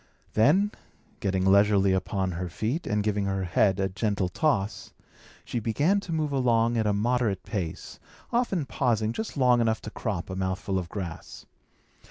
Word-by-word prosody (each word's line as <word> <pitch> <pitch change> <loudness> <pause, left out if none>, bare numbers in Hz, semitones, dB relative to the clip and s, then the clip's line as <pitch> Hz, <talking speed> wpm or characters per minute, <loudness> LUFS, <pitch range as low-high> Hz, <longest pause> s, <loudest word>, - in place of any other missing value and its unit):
Then, 175 - +4 0.5
getting 95 -1 0
leisurely 100 0 +4
upon 95 0 -1
her 90 +1 -4
feet, 110 - -3
and 105 0 0
giving 105 -1 0
her 95 -1 -1
head 95 +2 +2
a 95 - +1
gentle 100 -1 -1
toss, 110 - -1 0.5
she 120 - -2
began 145 - +1
to 185 - -8
move 155 -2 -1
along 120 -3 +2
at 110 -2 +1
a - - +3
moderate 110 -1 0
pace, 90 -8 -5 0.3
often 215 - +1
pausing 115 -5 0
just 220 - -5
long 125 -2 +4
enough 110 -1 +1
to 105 - -6
crop 100 -6 -4
a - - -3
mouthful 95 0 -1
of 85 -2 -6
grass. 85 -4 -7
105 Hz, 165 wpm, -27 LUFS, 95-125 Hz, 0.5 s, Then